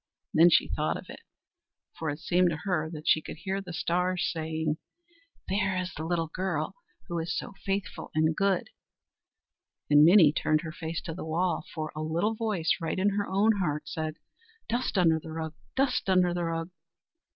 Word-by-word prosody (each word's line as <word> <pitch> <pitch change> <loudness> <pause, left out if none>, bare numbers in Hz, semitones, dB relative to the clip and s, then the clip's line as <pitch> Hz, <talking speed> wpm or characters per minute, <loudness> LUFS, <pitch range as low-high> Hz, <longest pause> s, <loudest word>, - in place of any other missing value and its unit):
Then 165 +2 +7
she - - +4
thought - - -1
of - - -10
it, - - -10 0.7
for 160 - -3
it 145 - -3
seemed 175 +2 +2
to 160 -1 -4
her 175 -6 0
that 155 -2 -8
she 155 - +5
could - - -8
hear 190 +3 -3
the 180 -2 -8
stars 180 +2 0
saying: 160 -1 -2 0.7
"There 190 -1 0
is 185 0 -3
the 155 - -5
little 170 -1 +1
girl 185 -5 -2 0.3
who 170 -1 -2
is 170 +2 -2
so - - -5
faithful 195 0 -3
and 155 0 +3
good"; 195 -1 +1 1.2
and 145 0 +8
Minnie 165 -3 +7
turned 155 -1 +1
her 165 -2 -6
face 160 +1 -5
to 165 - -5
the 175 - -6
wall, 165 +1 0
for 155 -1 -3
a 155 - -3
little 170 +8 0
voice, 215 -7 0
right 165 - -2
in 195 +2 +3
her 205 0 -1
own 205 +3 +3
heart, 150 -4 -1
said: 155 0 -3 0.5
"Dust 240 -2 -1
under 165 -3 +4
the 160 - -10
rug! 160 -1 -4 0.2
dust 265 -6 +1
under 180 -2 +4
the 175 -1 -1
rug!" 165 +1 -3
170 Hz, 185 wpm, -29 LUFS, 160-190 Hz, 1.2 s, and